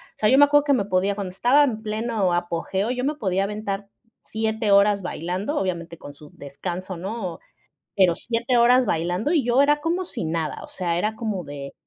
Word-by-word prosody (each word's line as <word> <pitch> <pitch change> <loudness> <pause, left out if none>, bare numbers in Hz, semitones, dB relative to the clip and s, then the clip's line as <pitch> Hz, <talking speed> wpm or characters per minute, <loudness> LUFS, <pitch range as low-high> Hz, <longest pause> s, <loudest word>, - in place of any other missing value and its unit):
O - - -41
sea, 210 - +3
yo 265 - +5
me 290 - +8
acuerdo 290 0 +4
que 285 - +3
me 205 -6 +1
podía 195 +1 0
cuando 195 -3 -5
estaba 245 +10 +4
en 220 -5 -3
pleno 215 -3 -1
apogeo 175 +4 -2
yo 250 0 -3
me 295 +3 0
podía 195 -7 0
aventar 200 -1 -4 0.3
7 220 -1 -1
horas 200 0 +4
bailando, 185 - -3
obviamente 170 -3 -3
con 145 - -11
su 150 +1 -15
descanso, 175 +6 -6
¿no? 185 -1 -5 0.6
Pero 185 -3 +4
7 235 +5 -1
horas 250 +2 +5
bailando, 175 - -1
y 310 -5 +3
yo 245 +3 +4
era 295 +1 +3
como 345 +4 -1
si 255 - -6
nada, 160 -1 -3
o - - -10
sea, 175 -2 -2
era 215 +4 -1
como 205 -7 -3
de, 140 -1 -8
200 Hz, 200 wpm, -23 LUFS, 180-240 Hz, 0.6 s, me